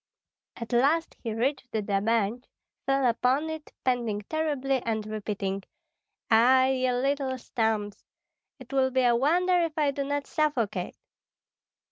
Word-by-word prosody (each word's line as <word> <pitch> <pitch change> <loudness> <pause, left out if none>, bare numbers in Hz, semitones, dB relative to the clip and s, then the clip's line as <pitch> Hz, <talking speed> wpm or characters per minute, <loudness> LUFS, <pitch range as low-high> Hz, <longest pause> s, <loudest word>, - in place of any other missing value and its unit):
At 230 +1 -7
last 295 +7 +2
he 230 - -3
reached 255 +3 -2
the 215 -1 -1
bench, 215 +3 0 0.4
fell 270 -1 +2
upon 255 +6 +1
it, 315 -1 -8
panting 235 -5 0
terribly 280 -4 -1
and 220 -2 -2
repeating, 205 -2 -3 0.7
"Ah, 255 +4 +6
ye 255 -1 +1
little 265 +1 0
stumps! 220 -4 -2 0.5
It - - -12
will 265 -1 +3
be 260 0 +1
a 240 -1 +4
wonder 350 +8 +3
if 330 -2 -2
I 295 -2 +2
do 280 0 -3
not 285 0 -2
suffocate." 240 - -1
255 Hz, 135 wpm, -27 LUFS, 225-280 Hz, 0.7 s, Ah